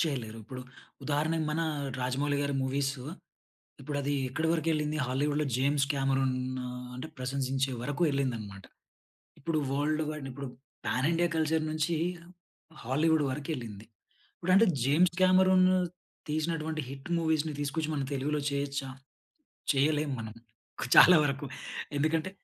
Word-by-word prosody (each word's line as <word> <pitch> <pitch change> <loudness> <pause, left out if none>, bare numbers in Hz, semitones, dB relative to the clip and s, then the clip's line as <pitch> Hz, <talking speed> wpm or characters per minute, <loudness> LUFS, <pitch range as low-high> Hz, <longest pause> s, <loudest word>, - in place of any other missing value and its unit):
చేయలేరు. 125 -9 -2
ఇప్పుడు 130 +1 -7 0.4
ఉదాహరణకు 155 +3 0
మన 160 +2 0 0.4
'రాజమౌళి' 140 +3 0
గారి 140 0 -1
మూవీసు, 135 0 -1 0.8
ఇప్పుడు 145 +1 -4
అది 145 +1 -1 0.2
ఎక్కడి 160 +5 -1
వరకు 165 -1 0
ఎళ్ళింది. 150 0 -1
హాలీవుడ్‌లో 145 +3 0
'జేమ్స్ 140 +1 +2
కామెరూన్' 135 -1 +1 0.3
ఆహ్, 125 0 -6
అంటే 145 +5 -6
ప్రశంసించే 135 +1 -1
వరకు 145 +5 -2
ఎళ్ళింది 135 -4 0
అనమాట. 100 -3 -9 0.8
ఇప్పుడు 155 +1 0
వర్ల్డ్ 150 +3 +1
‌‌‌వైడ్ 150 -3 -5
ఇప్పుడు 140 +1 -6 0.4
పాన్ 125 +7 +1
ఇండియా 175 +1 +2
కల్చర్ 160 0 +1
నుంచి 155 +2 0 0.9
హాలీవుడ్ 155 +5 +2
వరకు 145 +3 -5
ఎళ్ళింది. 110 -4 -8 0.5
ఇప్పుడు 185 - -1
అంటే 215 +4 +7 0.2
జేమ్స్ 165 +6 +3
కామెరూన్ 185 0 +6 0.6
తీసినటువంటి 155 0 -1
హిట్ 135 +4 -8
మూవీస్‌‌‌ని 160 -2 0
తీసుకొచ్చి, 155 +2 -1
మన 140 - -1
తెలుగులో 145 +2 -1
చేయొచ్చా? 140 -1 -2 0.9
చేయలేం 150 +1 +2
మనం. 110 0 -7 0.6
చాలా 180 - +10
వరకు. 140 0 -1 0.5
ఎందుకంటే 160 +4 +1
145 Hz, 130 wpm, -30 LUFS, 135-155 Hz, 0.9 s, చాలా